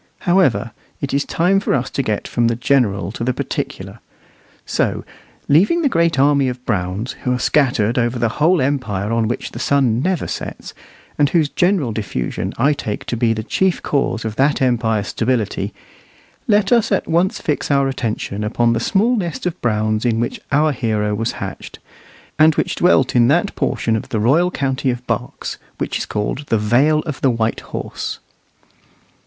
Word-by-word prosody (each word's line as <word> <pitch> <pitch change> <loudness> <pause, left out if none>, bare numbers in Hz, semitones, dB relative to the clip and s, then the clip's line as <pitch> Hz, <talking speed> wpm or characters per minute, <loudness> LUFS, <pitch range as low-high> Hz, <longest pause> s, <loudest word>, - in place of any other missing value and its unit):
However, 175 -10 +2 0.3
it 140 - -4
is 140 +1 +1
time 185 +4 +2
for 195 - 0
us 125 -1 -1
to - - -1
get 110 -5 -2
from 120 -1 +1
the 115 - +1
general 115 -8 +1
to 115 - -5
the 125 +1 0
particular; - - -4 0.7
so, - - -1 0.4
leaving 205 - +4
the 285 - +3
great 170 - +2
army 140 0 +3
of 125 0 -7
Browns, 100 +3 -2
who 125 - -1
are 125 - +1
scattered 125 -5 +2
over 120 +1 0
the 115 +3 -2
whole 165 -1 +4
empire 115 -7 -1
on 115 -1 +1
which 120 - -3
the - - -8
sun 130 -5 +2
never 185 +1 0
sets, - - -6 0.5
and 145 -1 +4
whose 155 -3 +2
general 175 - +1
diffusion 105 -1 -3
I 140 +5 +3
take 105 -7 -5
to - - -2
be 115 0 +2
the 110 -1 -4
chief 185 - 0
cause 125 -5 -1
of 110 -1 -4
that 140 +2 +2
empire's 115 -5 +1
stability; 115 -2 -1 0.8
let 210 0 +3
us 230 -2 +3
at 195 - +1
once 170 +3 +1
fix 150 - -2
our 140 -1 +3
attention 110 -5 -3
upon 115 +2 +1
the 115 - 0
small 215 - +2
nest 175 -8 -3
of 180 - -3
Browns 110 -1 0
in 115 -2 +1
which 120 - -2
our 150 +2 +3
hero 110 -5 -1
was 115 +3 -1
hatched, - - -7 0.6
and 155 0 +6
which - - 0
dwelt 135 -8 +3
in 120 -1 +5
that 175 +9 +2
portion 115 - 0
of 110 - -4
the 110 - -1
royal 150 +11 +3
county 135 -4 -1
of 125 0 -3
Berks 120 0 -4 0.2
which - - -2
is - - -4
called 110 +7 -3
the 115 - +2
Vale 130 +9 +3
of 150 - -4
White 115 -4 +1
Horse. - - -5
125 Hz, 180 wpm, -19 LUFS, 115-150 Hz, 0.8 s, and